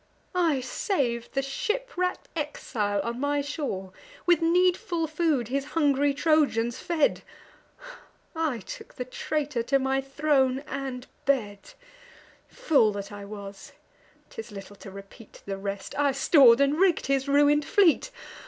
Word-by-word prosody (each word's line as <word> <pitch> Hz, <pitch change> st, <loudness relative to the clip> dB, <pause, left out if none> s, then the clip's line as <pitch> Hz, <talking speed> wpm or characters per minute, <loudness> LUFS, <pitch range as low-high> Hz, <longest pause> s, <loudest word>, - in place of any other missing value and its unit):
I 330 Hz, -7 st, +2 dB
sav'd 250 Hz, -, -2 dB
the 270 Hz, -, 0 dB
shipwreck'd 395 Hz, -, -2 dB
exile 220 Hz, -9 st, -2 dB
on 235 Hz, +2 st, -4 dB
my 285 Hz, +1 st, 0 dB
shore; 275 Hz, -, -4 dB, 0.3 s
With 350 Hz, -1 st, +4 dB
needful 350 Hz, +1 st, +2 dB
food 305 Hz, -7 st, 0 dB
his 275 Hz, +2 st, -1 dB
hungry 285 Hz, -2 st, +3 dB
Trojans 280 Hz, -6 st, +1 dB
fed; 330 Hz, -4 st, +1 dB, 1.1 s
I 315 Hz, -8 st, -1 dB
took -, -, -10 dB
the 250 Hz, -, -4 dB
traitor 290 Hz, 0 st, -2 dB
to 275 Hz, +4 st, +2 dB
my 270 Hz, 0 st, 0 dB
throne 270 Hz, -1 st, +1 dB
and 265 Hz, -3 st, -5 dB, 0.2 s
bed: 210 Hz, -8 st, -1 dB, 0.7 s
Fool 290 Hz, -, +2 dB
that 200 Hz, 0 st, -6 dB
I 205 Hz, -1 st, -8 dB
was—— 200 Hz, -1 st, -10 dB, 0.6 s
'tis 450 Hz, -, -8 dB
little 200 Hz, 0 st, -10 dB
to 195 Hz, -, -11 dB
repeat 195 Hz, +3 st, -13 dB
The 195 Hz, -1 st, -4 dB
rest, 200 Hz, 0 st, -5 dB
I 285 Hz, -1 st, +2 dB
stor'd 270 Hz, -3 st, +6 dB
and 280 Hz, +3 st, +2 dB
rigg'd 370 Hz, -3 st, +3 dB
his 275 Hz, 0 st, 0 dB
ruin'd 290 Hz, +1 st, +4 dB
fleet. 380 Hz, +5 st, +3 dB
275 Hz, 135 wpm, -26 LUFS, 235-315 Hz, 1.1 s, stor'd